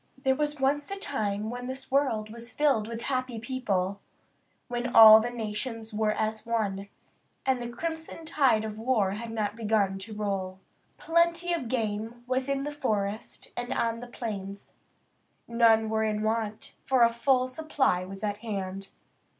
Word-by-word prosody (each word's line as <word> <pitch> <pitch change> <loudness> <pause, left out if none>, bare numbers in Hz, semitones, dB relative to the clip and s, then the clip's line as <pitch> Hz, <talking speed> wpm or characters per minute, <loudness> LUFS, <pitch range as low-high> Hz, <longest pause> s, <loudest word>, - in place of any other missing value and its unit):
There 265 0 +2
was 295 +1 -2
once 285 +2 +1
a 395 - -4
time 215 - -2
when 245 0 -5
this 260 0 -7
world 240 -6 +1
was 235 +1 -8
filled 270 -6 +2
with 230 0 -6
happy 255 -3 -2
people; 200 -6 -2 0.7
when 245 0 -3
all 220 -1 +11
the 235 +2 -1
nations 225 0 -4
were 215 0 +1
as 215 0 -2
one, 200 -4 -2 0.6
and 260 -2 +1
the 240 - -4
crimson 320 +5 -5
tide 270 -9 +3
of 215 0 -6
war 220 -5 +2
had 225 +3 -5
not 215 -2 -2
begun 210 -4 +1
to 215 +2 -8
roll. 195 -3 -3 0.4
Plenty 340 +1 +2
of 305 -8 -2
game 225 0 -3
was 260 +1 -1
in 275 0 0
the 295 - -3
forest 215 -7 -3
and 245 +1 -4
on 230 -2 0
the 245 - -8
plains. 200 -5 -6 0.7
None 230 -1 +4
were 220 0 0
in 215 -1 -1
want, 220 -1 -2
for 260 -3 +4
a 230 0 +4
full 255 +2 +2
supply 265 - 0
was 195 +2 -8
at 205 -1 -1
hand. 195 -3 -4
230 Hz, 165 wpm, -28 LUFS, 210-260 Hz, 0.7 s, all